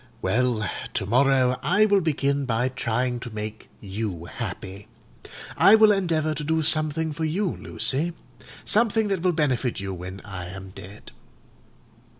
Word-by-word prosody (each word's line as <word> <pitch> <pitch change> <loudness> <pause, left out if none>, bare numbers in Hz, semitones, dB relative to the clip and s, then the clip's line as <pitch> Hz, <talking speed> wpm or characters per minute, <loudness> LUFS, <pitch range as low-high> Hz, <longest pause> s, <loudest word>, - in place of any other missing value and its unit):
Well, 120 -2 0 0.3
to - - -1
morrow 130 +2 +3
I 210 +4 +3
will 200 -2 +3
begin 140 -3 0
by 125 +1 0
trying 125 0 -1
to 125 - -7
make 110 0 -7
you 95 -4 -5
happy. 100 -1 -7 0.7
I 205 - +7
will 220 -1 +6
endeavour 165 -6 0
to 150 0 -5
do 160 +1 0
something 155 0 +2
for 160 - -4
you, 175 +4 -1
Lucy: 160 +6 0 0.5
something 220 -1 +2
that 195 -3 -1
will 180 0 +2
benefit 130 -8 0
you 95 -1 -4
when 95 +2 -7
I 95 -3 -7
am 95 +1 -9
dead. 95 +2 -12
130 Hz, 150 wpm, -24 LUFS, 105-160 Hz, 0.7 s, I